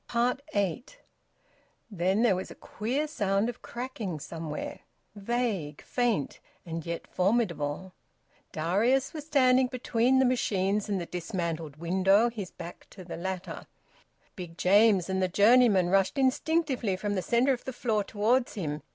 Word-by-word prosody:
EIGHT. 200 - -2 0.9
Then 190 +3 +1
there 225 -6 +4
was 185 - -5
a - - -10
queer 260 +8 -3
sound 205 -6 0
of 245 - -8
cracking 235 -9 -5
somewhere, 160 0 -6 0.4
vague, 205 -8 -2
faint, 235 - -1 0.3
and 165 -1 -5
yet 170 0 -4
formidable. 185 -4 -1 0.6
Darius 215 - +1
was 305 -2 -7
standing 260 -3 +4
between 250 0 +1
the 265 - +4
machines 210 -5 0
and 200 -2 0
the 175 - -4
dismantled 170 -4 -4
window, 190 +7 +3
his 205 -6 -6
back 170 +1 -10
to 190 - -11
the 175 - -7
latter. 185 0 -5 0.7
Big 175 -2 -8
James 200 -1 +4
and 190 0 -1
the 185 - +2
journeyman 205 -1 +5
rushed 195 +7 +2
instinctively 265 - +1
from 205 +2 -3
the 190 - -1
centre 245 +7 +2
of 245 - -6
the 260 - -3
floor 225 -4 -1
towards 230 +6 0
him. 155 -6 -3
200 Hz, 145 wpm, -28 LUFS, 180-245 Hz, 0.9 s, journeyman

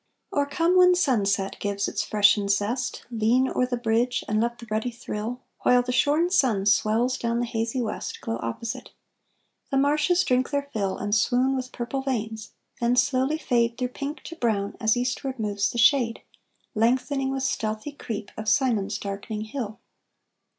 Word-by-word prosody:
Or 285 -1 +1
come 335 +5 +2
when 360 0 +7
sunset 200 - +1
gives 200 -1 -1
its - - -1
freshened 205 -1 +3
zest, 215 +6 -1
Lean 235 +3 +2
o'er 250 -1 0
the 245 -1 -2
bridge 235 +1 +1
and 215 +1 +1
let 235 +1 -1
the 240 - -10
ruddy 220 +3 0
thrill, 235 +1 -5 0.2
While 250 0 +4
the 250 - -3
shorn 300 +7 +2
sun 240 - +2
swells 220 +4 +2
down 235 0 0
the 240 - 0
hazy 230 +1 -2
west, 215 - -4
Glow 115 +1 -4
opposite; 115 - -5 0.8
the 275 - 0
marshes 300 +6 +3
drink 255 0 +1
their 280 -1 -1
fill 195 -3 -1
And 205 0 -3
swoon 250 +5 +2
with 255 -1 -4
purple 245 +3 -3
veins, 220 -5 -3 0.3
then 240 +1 +2
slowly 265 +4 +2
fade 235 -5 +1
Through 250 -1 -1
pink 280 +4 -5
to 335 - -8
brown, 215 -8 -1
as 220 0 +2
eastward 255 +2 -2
moves 205 -2 0
the - - -6
shade, 235 -1 +3 0.5
Lengthening 260 +4 +1
with 270 0 -2
stealthy 215 +2 -2
creep, 220 -7 -6
of 215 0 -2
Simond's 215 -6 +1
darkening 205 +2 -5
hill. 220 -1 -5
240 Hz, 170 wpm, -25 LUFS, 215-265 Hz, 0.8 s, when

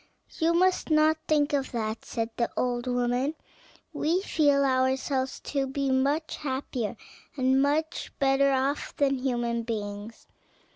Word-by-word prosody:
"You 330 +1 +3
must 370 0 +2
not 310 0 +4
think 295 -1 +2
of 275 -2 -1
that," 220 -1 -3
said 230 0 -3
the 235 - 0
old 245 0 -1
woman; 245 +4 0 0.6
"we 345 +5 0
feel 285 -6 +3
ourselves 260 0 0
to 275 -2 -2
be 270 0 -1
much 280 +4 0
happier 260 -5 -3 0.4
and 260 0 +3
much 310 +4 0
better 275 0 +3
off 270 +2 -1
than 275 -2 +1
human 240 -2 -1
beings." 210 -1 -5
270 Hz, 135 wpm, -27 LUFS, 245-290 Hz, 0.6 s, not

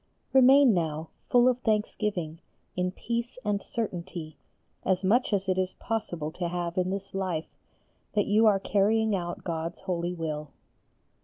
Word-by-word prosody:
Remain 265 -1 +7
now 160 -2 -1 0.2
full 245 0 +5
of 250 -1 +2
thanksgiving 210 -7 -1 0.4
in 180 0 0
peace 235 +5 -3
and 205 -1 0
certainty, 175 -7 -5 0.5
as 185 0 +1
much 225 +7 +3
as 195 -2 0
it 185 0 +1
is 185 0 -1
possible 175 -9 -3
to 175 +1 -3
have 175 0 -3
in 185 0 +1
this 195 +1 -4
life, 185 -5 -2 0.7
that 205 - +3
you 220 +2 +4
are 200 -2 +4
carrying 210 +2 +2
out 175 -2 -4
God's 165 0 -4
holy 180 -2 -2
will. 155 -3 -4
190 Hz, 150 wpm, -28 LUFS, 170-215 Hz, 0.7 s, Remain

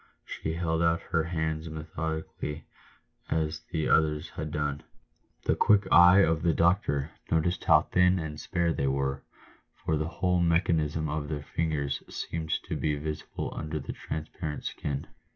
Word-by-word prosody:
She 80 - -4
held 80 -1 0
out 85 0 +3
her 80 -2 -1
hands 80 -1 -2
methodically 80 -1 -5 0.6
as 80 0 0
the 80 -2 0
others 75 0 +2
had 75 0 -5
done. 75 -1 -2 0.6
The - - +3
quick 105 -1 +5
eye 90 +3 +8
of 80 -4 +2
the 85 -2 +2
doctor 85 -4 +2 0.2
noticed 80 +3 +1
how - - +6
thin 90 0 +3
and 75 -3 -4
spare 85 -2 0
they 70 - 0
were, 70 0 0 0.5
for 80 - -1
the 75 +1 -1
whole 90 +1 +1
mechanism 80 -3 +2
of 75 0 -2
the 75 -2 -3
fingers 75 -3 -1
seemed 80 -1 -4
to - - -4
he 75 -1 +1
visible 75 +1 -5
under 75 0 -3
the 70 - -6
transparent 75 0 -5
skin. 70 -2 -3
80 Hz, 150 wpm, -29 LUFS, 75-85 Hz, 0.6 s, eye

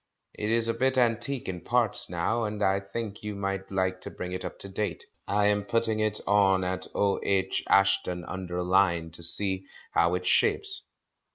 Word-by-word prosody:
It 105 - -4
is 115 0 +2
a 115 - 0
bit 130 +1 0
antique 120 +2 0
in 90 -2 -5
parts 120 -4 +1
now, 90 +7 -1
and 105 0 -3
I 95 0 +2
think 105 +1 -7
you 105 -1 -5
might 95 -1 -4
like 95 -1 -1
to - - -6
bring 90 - -7
it 90 - -5
up - - -7
to - - -8
date. 105 +2 -4 0.2
I 100 +1 +1
am 105 0 +2
putting 110 +1 +1
it 110 -1 +2
on 95 -2 +3
at 90 0 -3
O.H. 100 -1 0
Ashton 95 -3 +2
under 90 -1 -5
Lyne 90 -3 +1
to 85 - -2
see 95 +2 +6 0.2
how 85 +1 +2
it 90 0 -4
shapes. 400 - +1
100 Hz, 185 wpm, -27 LUFS, 95-110 Hz, 0.2 s, see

